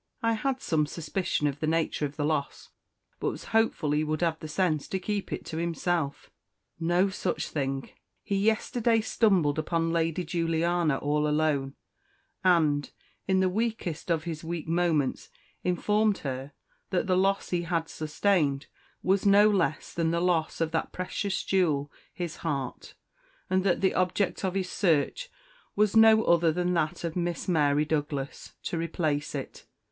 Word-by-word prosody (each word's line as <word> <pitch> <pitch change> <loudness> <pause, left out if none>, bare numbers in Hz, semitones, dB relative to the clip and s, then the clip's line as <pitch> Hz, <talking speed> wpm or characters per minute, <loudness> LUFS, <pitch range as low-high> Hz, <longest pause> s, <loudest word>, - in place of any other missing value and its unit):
I 230 0 +3
had 265 +4 -2
some 150 -2 +1
suspicion 165 0 -2
of 145 -1 -1
the 155 - -1
nature 160 -2 0
of 140 - -14
the 145 - 0
loss, 150 -2 -2 0.5
but - - 0
was - - -7
hopeful 225 -9 +1
he 150 +1 +2
would 155 +1 -2
have 165 -2 +1
the 155 - -7
sense 155 -2 0
to 190 - -2
keep 200 +1 -3
it - - -4
to 160 - -5
himself. 170 -3 -2 0.5
No 175 +4 +2
such - - -2
thing: 135 -2 -3 0.3
he 200 - -2
yesterday 225 +2 +2
stumbled 190 -10 +2
upon 165 +1 0
Lady 165 +1 0
Juliana 165 -2 +1
all 150 +1 0
alone, 150 -3 0 0.7
and, 155 -6 +3 0.4
in 190 -1 +3
the 190 - +3
weakest 195 -5 -2
of 165 -2 +1
his 160 -2 -5
weak 165 -1 -4
moments, 165 -4 0 0.3
informed 210 +3 +2
her 135 +1 -4 0.4
that 185 -2 0
the 185 - +2
loss 195 +1 +1
he 175 -1 +1
had 165 -1 -1
sustained 155 -3 0 0.4
was 190 +2 +2
no 205 +1 +6
less 190 -6 0
than 165 -1 0
the 170 +1 +1
loss 170 -3 0
of 160 -1 0
that 165 - -1
precious 190 +1 -3
jewel 155 -7 +1 0.2
his 175 -3 -5
heart; 140 -5 -4 0.6
and 185 0 +3
that 190 -2 +1
the 190 - +3
object 185 +2 0
of 190 -1 -1
his 190 -2 -2
search 195 - +1 0.5
was 210 +1 +2
no 220 0 +7
other 170 -3 +4
than 180 +2 0
that 155 -2 -1
of 165 -1 -3
Miss 175 -1 -2
Mary 150 -4 +3
Douglas 145 -2 -3
to 170 - -2
replace 155 -3 -1
it! - - -7
170 Hz, 160 wpm, -28 LUFS, 155-190 Hz, 0.7 s, no